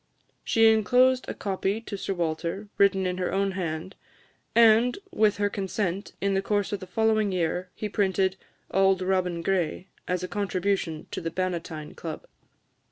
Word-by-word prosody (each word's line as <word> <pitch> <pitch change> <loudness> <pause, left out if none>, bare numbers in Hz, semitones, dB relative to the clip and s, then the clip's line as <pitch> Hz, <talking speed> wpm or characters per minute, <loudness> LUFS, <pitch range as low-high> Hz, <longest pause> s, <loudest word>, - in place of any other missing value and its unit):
She 225 0 +4
enclosed 250 +4 +3
a - - -4
copy 195 +1 -1
to 230 - -6
Sir 195 0 -3
Walter, 170 +4 -2
written 195 -1 +4
in 180 0 -2
her 180 - -1
own 195 0 +1
hand; 175 0 -4 0.6
and, 230 +1 +5
with 210 -1 +2
her 205 0 +2
consent, 195 -1 -3
in 200 0 0
the 195 - +2
course 205 0 0
of 205 - -2
the 185 - -9
following 215 +1 +2
year, 180 0 -1
he 215 - -3
printed 190 -2 +1 0.4
"Auld 190 -1 +3
Robin 180 -2 0
Gray" 180 0 -1 0.2
as 180 0 -1
a - - -2
contribution 190 -5 -1
to - - -4
the 165 - -2
Bannatyne 170 -4 -4
Club. 160 -2 -6
190 Hz, 165 wpm, -26 LUFS, 180-205 Hz, 0.6 s, and